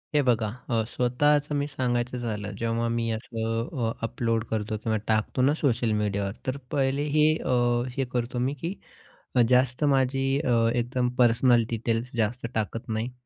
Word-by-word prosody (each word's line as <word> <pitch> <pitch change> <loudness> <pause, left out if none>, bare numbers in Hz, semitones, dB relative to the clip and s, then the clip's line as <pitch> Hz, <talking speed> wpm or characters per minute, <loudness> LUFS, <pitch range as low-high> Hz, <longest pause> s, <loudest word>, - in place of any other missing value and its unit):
हे 145 - +5
बघा. 120 -4 +2 0.2
अ, 115 -2 +1
स्वतःचं 145 +5 +1
मी 145 0 0
सांगायचं 125 -2 -1
झालं, 105 -4 -4
जेव्हा 115 0 -1
मी 115 0 -1
असं 115 +3 -2
अ, - - 0
अपलोड 115 -1 -1
करतो 110 0 -2
किंवा 110 -1 +1
टाकतो 110 +3 +1
ना, 140 +3 +4
सोशल 120 -5 +1
मीडियावर, 100 -1 -1 0.2
तर 130 +1 -1
पहिले 135 +1 +1
हे, 150 0 +5 0.2
अ, 120 -1 +2
हे 135 - +1
करतो 120 0 -2
मी, 130 +3 0
की 170 +3 -2 0.8
जास्त 125 +1 +3
माझी 135 0 +1
अ, 125 - +1 0.2
एकदम 125 +1 0
पर्सनल 120 0 +4
डिटेल्स 115 +1 -1
जास्त 115 +2 0
टाकत 110 +1 -3
नाही. 110 +3 -2
120 Hz, 160 wpm, -26 LUFS, 115-130 Hz, 0.8 s, हे